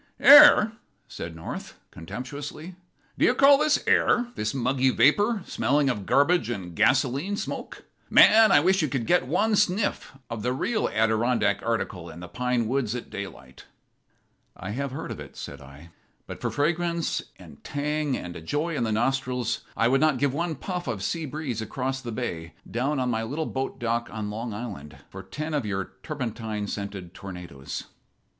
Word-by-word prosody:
"Air!" 285 -7 +9 0.4
said 85 -1 -7
North, 80 - -8
contemptuously. 145 - -7 0.5
"Do - - +4
you 250 - +3
call 275 +1 +6
this 305 0 +2
air? 245 0 +3
this 110 0 -2
muggy 130 0 +1
vapor, 205 - +3
smelling 140 0 +1
of 105 -5 -6
garbage 165 +2 +3
and 90 -7 -5
gasoline 140 - +2
smoke. - - -6 0.3
Man, 220 0 +7
I 145 - +6
wish 190 +3 +3
you 155 - +1
could 130 -4 -2
get 175 -4 +2
one 210 +9 +2
sniff 200 -7 0
of 115 -2 -5
the 125 +3 0
real 215 - -1
Adirondack 110 -1 +1
article 100 -7 -3
in 85 - -10
the 90 - -8
pine 125 +3 -1
woods 125 -2 -1
at 125 - -7
daylight." 65 -10 -9 0.9
"I - - -6
have 140 +5 -3
heard 135 - -6
of - - -6
it," - - -11
said 70 0 -8
I. 70 +5 -14 0.3
"But - - -9
for - - -1
fragrance 170 +3 0 0.2
and 70 - -15
tang 150 -1 -1
and 90 -1 -7
a 85 - -8
joy 150 - -2
in 120 - -1
the 110 - -1
nostrils 125 +1 0 0.2
I 115 - +3
would 135 +2 +2
not 155 -4 +3
give 140 0 +1
one 170 +2 -2
puff 180 +5 -5
of 100 -3 -3
sea 160 - -2
breeze 135 -6 -4
across 130 +4 -3
the 120 - -6
bay, 85 -9 -5
down 135 +5 -1
on 125 -1 0
my 110 -1 -1
little 145 +8 -3
boat 135 -2 -4
dock 120 -1 -1
on 105 -1 -4
Long 115 +2 -5
Island, 100 -9 -7
for - - -8
ten 155 +1 -6
of 145 -3 0
your 95 -2 -3
turpentine 115 -7 -4
scented 100 -3 -6
tornadoes." 90 -9 -7
125 Hz, 175 wpm, -26 LUFS, 105-155 Hz, 0.9 s, Air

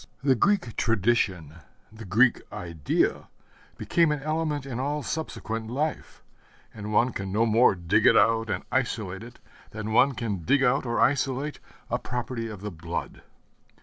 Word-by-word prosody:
The 135 -1 +4
Greek 130 - +1
tradition, 95 -8 0 0.3
the 110 0 -11
Greek 115 +7 +3
idea 85 -4 -1 0.5
became 165 -2 +2
an 145 -2 -3
element 155 -2 -1
in 125 -3 -5
all 145 +2 -2
subsequent 115 -8 -4
life; 150 +6 -3 0.5
and 105 -1 -6
one 120 +4 +3
can 95 -1 -4
no 110 +4 +2
more 115 -1 +4
dig 85 -2 +2
it - - +6
out 115 0 +3
and 95 -3 -2
isolate 110 -7 -1
it 120 +1 -11 0.3
than 110 0 -5
one 130 +4 +5
can 105 -6 -3
dig 135 - +2
out 135 +1 +2
or 120 - -1
isolate 135 +2 +1 0.3
a - - +1
property 125 -1 -4
of 105 -4 -8
the 105 0 -5
blood. 85 0 -6
115 Hz, 155 wpm, -26 LUFS, 105-135 Hz, 0.5 s, it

